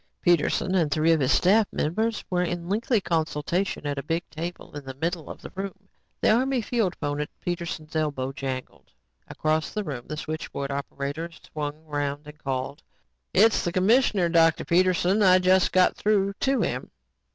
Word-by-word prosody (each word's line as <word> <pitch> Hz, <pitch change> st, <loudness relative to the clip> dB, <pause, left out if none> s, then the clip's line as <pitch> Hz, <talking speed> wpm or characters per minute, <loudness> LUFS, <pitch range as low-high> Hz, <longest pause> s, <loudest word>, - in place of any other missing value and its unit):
Peterson 175 Hz, +2 st, +2 dB
and 170 Hz, -5 st, +2 dB
three 155 Hz, +3 st, +3 dB
of 165 Hz, -, +4 dB
his 130 Hz, -2 st, +2 dB
staff 205 Hz, +3 st, +4 dB
members 220 Hz, +9 st, -1 dB
were 180 Hz, -1 st, 0 dB
in 175 Hz, -1 st, -2 dB
lengthy 220 Hz, +4 st, +1 dB
consultation 165 Hz, 0 st, -1 dB
at 145 Hz, -1 st, -2 dB
a -, -, -6 dB
big 165 Hz, +1 st, -2 dB
table 165 Hz, +1 st, -6 dB
in 145 Hz, -, -6 dB
the 135 Hz, -1 st, -8 dB
middle 165 Hz, +3 st, -3 dB
of -, -, -9 dB
the -, -, -8 dB
room. 195 Hz, 0 st, -6 dB, 0.3 s
The -, -, +4 dB
Army 260 Hz, +3 st, +2 dB
field 220 Hz, -5 st, 0 dB
phone 145 Hz, 0 st, -2 dB
at 150 Hz, -, -4 dB
Peterson's 170 Hz, -3 st, -4 dB
elbow 145 Hz, -4 st, -1 dB
jangled. 135 Hz, -2 st, -6 dB, 0.4 s
Across 155 Hz, 0 st, -1 dB
the 210 Hz, -, -1 dB
room, 135 Hz, -9 st, -6 dB
the 155 Hz, -, -5 dB
switchboard 155 Hz, -3 st, -4 dB
operator 140 Hz, +3 st, -4 dB
swung 150 Hz, -1 st, -7 dB
around 145 Hz, -1 st, -3 dB
and 150 Hz, 0 st, -12 dB
called: 135 Hz, 0 st, -3 dB, 0.5 s
"It's 220 Hz, +3 st, +4 dB
the 175 Hz, -, -1 dB
commissioner, 195 Hz, 0 st, +3 dB
Dr. 165 Hz, -1 st, +3 dB
Peterson. 185 Hz, +3 st, +3 dB
I 185 Hz, -2 st, +7 dB
just 185 Hz, 0 st, +3 dB
got 185 Hz, 0 st, +4 dB
through 200 Hz, -2 st, +1 dB
to 270 Hz, 0 st, +2 dB
him." -, -, -2 dB
170 Hz, 175 wpm, -26 LUFS, 150-190 Hz, 0.5 s, I